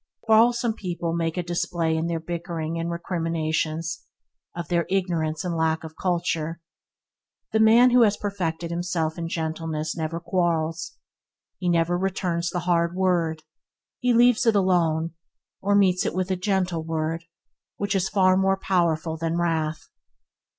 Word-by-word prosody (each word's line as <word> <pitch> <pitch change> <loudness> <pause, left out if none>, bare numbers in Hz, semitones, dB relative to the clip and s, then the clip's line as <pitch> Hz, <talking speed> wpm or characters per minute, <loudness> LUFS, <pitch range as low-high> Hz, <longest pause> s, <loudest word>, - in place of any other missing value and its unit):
Quarrelsome 230 +1 +4
people 175 -5 -3
make 165 0 -1
a 180 - 0
display 170 -1 -1
in 160 +1 -1
their 170 -1 -1
bickering 165 -1 -4
and 165 +1 -2
recriminations 165 -2 -2 0.3
– - - -49
of 170 -3 -4
their 170 -2 0
ignorance 170 -4 -1
and 175 -2 -2
lack 160 0 0
of 160 0 -9
culture. 170 -3 -1 0.9
The 220 - +2
man 230 +3 +6
who 250 0 +6
has 210 -3 +4
perfected 175 -5 -3
himself 170 -2 -2
in 165 0 -3
gentleness 160 -1 -3
never 165 0 -3
quarrels. 165 -2 -1 0.7
He 180 - 0
never 170 +1 +2
returns 180 -3 -1
the 175 +1 -2
hard 170 0 +1
word; 170 -4 +1 0.6
he 250 -1 +2
leaves 240 0 +4
it 225 - +4
alone, 170 -4 +2 0.5
or 200 +1 +2
meets 185 -3 +4
it - - -2
with 185 0 -1
a - - +2
gentle 185 -3 -1
word 160 +1 -2 0.5
which 200 0 -1
is 190 -1 +1
far 185 -2 +4
more 195 0 +2
powerful 170 -4 0
than 165 +1 -1
wrath. 160 -2 -1
170 Hz, 150 wpm, -25 LUFS, 165-185 Hz, 0.9 s, man